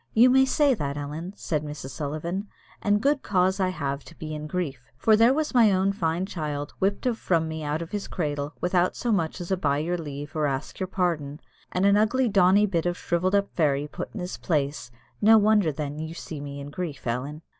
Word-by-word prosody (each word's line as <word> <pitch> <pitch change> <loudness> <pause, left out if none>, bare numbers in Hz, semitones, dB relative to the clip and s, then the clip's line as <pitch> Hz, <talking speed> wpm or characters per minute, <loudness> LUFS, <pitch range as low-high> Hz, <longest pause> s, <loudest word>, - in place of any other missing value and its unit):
"You 245 +3 +7
may 265 +1 +6
say 280 +1 +3
that, 140 - -3
Ellen," 155 +6 -5
said 155 -6 -2
Mrs. 145 -3 -7
Sullivan, 155 +8 -4 0.3
"and 205 0 +2
good 285 0 +2
cause 190 0 +1
I 185 -1 +2
have 140 -5 -3
to 165 - -14
be 155 -1 -6
in 150 0 -5
grief, 145 -8 -4
for 220 - +4
there 230 +3 +6
was 305 +2 0
my 230 -4 +6
own 190 +1 +2
fine 170 -1 -1
child 150 -6 -4
whipped 200 +4 0
of 240 -3 0
from 165 -3 +1
me 160 0 -5
out 150 +2 -1
of 165 - -11
his 205 -1 -3
cradle, 145 -2 -3
without 180 0 +2
as - - -8
much 170 -2 -1
as 175 +1 -6
'by 150 -7 +1
your 170 +4 -1
leave' 145 0 -7
or 155 -1 +1
'ask 135 -1 -4
your 185 - -1
pardon,' 165 -6 -1 0.3
and 185 +2 +1
an 200 0 +5
ugly 240 +5 +2
dony 200 0 +5
bit 175 -3 0
of 175 - 0
a - - -13
shrivelled 180 +3 0
up 200 0 +1
fairy 145 -3 +1
put - - -6
in - - -4
his 180 +1 -5
place; 145 -6 -1 0.3
no 220 +1 +7
wonder, 210 -5 +4
then, 145 0 -4
that 155 - -4
you 160 +1 -8
see 155 -3 -7
me 140 0 -6
in 140 +1 -7
grief, 155 -5 -5
Ellen." 135 +6 -3
170 Hz, 230 wpm, -26 LUFS, 150-200 Hz, 0.3 s, You